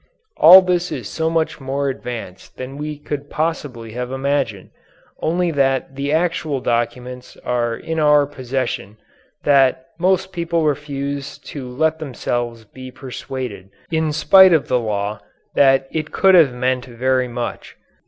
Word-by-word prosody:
All 185 Hz, +3 st, +10 dB
this 180 Hz, -1 st, 0 dB
is 125 Hz, -9 st, -5 dB
so 160 Hz, 0 st, -1 dB
much 160 Hz, -2 st, -1 dB
more 135 Hz, +1 st, -2 dB
advanced 120 Hz, -8 st, -7 dB
than 130 Hz, +1 st, -7 dB
we 150 Hz, +1 st, -5 dB
could 145 Hz, -1 st, -6 dB
possibly 145 Hz, -8 st, -3 dB
have 125 Hz, +2 st, -5 dB
imagined, 135 Hz, -6 st, -2 dB, 0.5 s
only 175 Hz, +2 st, 0 dB
that 135 Hz, -2 st, 0 dB
the 140 Hz, +1 st, -2 dB
actual 160 Hz, -3 st, 0 dB
documents 125 Hz, +1 st, -3 dB
are 120 Hz, -1 st, 0 dB
in 160 Hz, 0 st, -4 dB
our 150 Hz, -1 st, +5 dB
possession, 130 Hz, -6 st, -4 dB, 0.5 s
that 135 Hz, -2 st, +3 dB
most 190 Hz, +1 st, +1 dB
people 170 Hz, -1 st, -1 dB
refuse 140 Hz, -1 st, -3 dB, 0.2 s
to 130 Hz, -4 st, -6 dB
let 160 Hz, +5 st, 0 dB
themselves 120 Hz, -5 st, -3 dB
be 130 Hz, +4 st, -11 dB
persuaded 125 Hz, -6 st, -7 dB, 0.2 s
in 160 Hz, -1 st, +1 dB
spite 185 Hz, +4 st, +6 dB
of 160 Hz, -, +2 dB
the 125 Hz, -, +2 dB
law 105 Hz, -2 st, -2 dB, 0.3 s
that 135 Hz, -1 st, +4 dB
it 155 Hz, -1 st, -3 dB
could 190 Hz, -1 st, +4 dB
have 165 Hz, -7 st, +6 dB
meant 125 Hz, 0 st, -1 dB
very 130 Hz, +1 st, 0 dB
much. 120 Hz, 0 st, -6 dB
135 Hz, 145 wpm, -20 LUFS, 125-155 Hz, 0.5 s, All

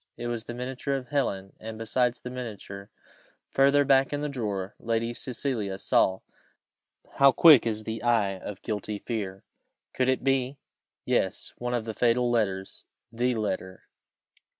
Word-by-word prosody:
It 120 Hz, -, -6 dB
was 120 Hz, -1 st, -3 dB
the 120 Hz, -, -6 dB
miniature 130 Hz, +3 st, -3 dB
of 130 Hz, -3 st, -5 dB
Helen, 100 Hz, -9 st, -1 dB
and 110 Hz, 0 st, -7 dB
besides 120 Hz, +2 st, 0 dB
the 125 Hz, -, -7 dB
miniature, 105 Hz, -5 st, -7 dB, 0.6 s
further 140 Hz, +1 st, +4 dB
back 135 Hz, -1 st, +4 dB
in 145 Hz, 0 st, -2 dB
the 150 Hz, -, -2 dB
drawer, 105 Hz, -7 st, -3 dB
Lady 115 Hz, +1 st, -1 dB
Cecilia 120 Hz, -6 st, -3 dB
saw 95 Hz, -1 st, +2 dB, 1.0 s
how 140 Hz, 0 st, +7 dB
quick 145 Hz, -2 st, +7 dB
is 110 Hz, -1 st, -2 dB
the 110 Hz, +1 st, -4 dB
eye 105 Hz, -5 st, +2 dB
of 100 Hz, +1 st, -8 dB
guilty 105 Hz, -1 st, -3 dB
fear! 100 Hz, -4 st, -4 dB, 0.5 s
could 130 Hz, 0 st, +1 dB
it 130 Hz, -, +1 dB
be? 135 Hz, 0 st, +1 dB, 0.5 s
yes -, -, 0 dB
one 125 Hz, 0 st, -1 dB
of 115 Hz, -2 st, -2 dB
the 110 Hz, -, -4 dB
fatal 120 Hz, +1 st, +2 dB
letters 95 Hz, -5 st, -1 dB, 0.3 s
the 120 Hz, +2 st, 0 dB
letter! 95 Hz, -4 st, -3 dB
120 Hz, 150 wpm, -27 LUFS, 105-130 Hz, 1.0 s, how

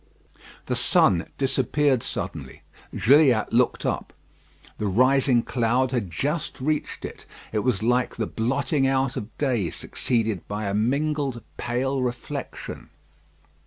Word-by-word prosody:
The -, -, -1 dB
sun 85 Hz, -2 st, +3 dB
disappeared 135 Hz, 0 st, +1 dB
suddenly. -, -, -6 dB, 0.3 s
Gilliatt 125 Hz, 0 st, +4 dB
looked 125 Hz, +1 st, +2 dB
up. -, -, -2 dB, 0.7 s
The 105 Hz, -, -1 dB
rising 130 Hz, +3 st, +3 dB
cloud 125 Hz, +1 st, +1 dB
had 120 Hz, -8 st, -1 dB
just 150 Hz, -, -2 dB
reached 150 Hz, +3 st, -2 dB
it. -, -, -9 dB, 0.2 s
It 110 Hz, -, 0 dB
was 110 Hz, -2 st, 0 dB
like 125 Hz, +1 st, +1 dB
the 115 Hz, -, -1 dB
blotting 135 Hz, +5 st, 0 dB
out 135 Hz, -1 st, +1 dB
of 105 Hz, +2 st, -7 dB
day, 120 Hz, -, 0 dB
succeeded 110 Hz, -6 st, -2 dB
by 105 Hz, +1 st, -3 dB
a 100 Hz, -, -1 dB
mingled 135 Hz, +3 st, 0 dB
pale 130 Hz, +3 st, -1 dB
reflection. 125 Hz, -1 st, -5 dB
125 Hz, 125 wpm, -25 LUFS, 110-135 Hz, 0.7 s, Gilliatt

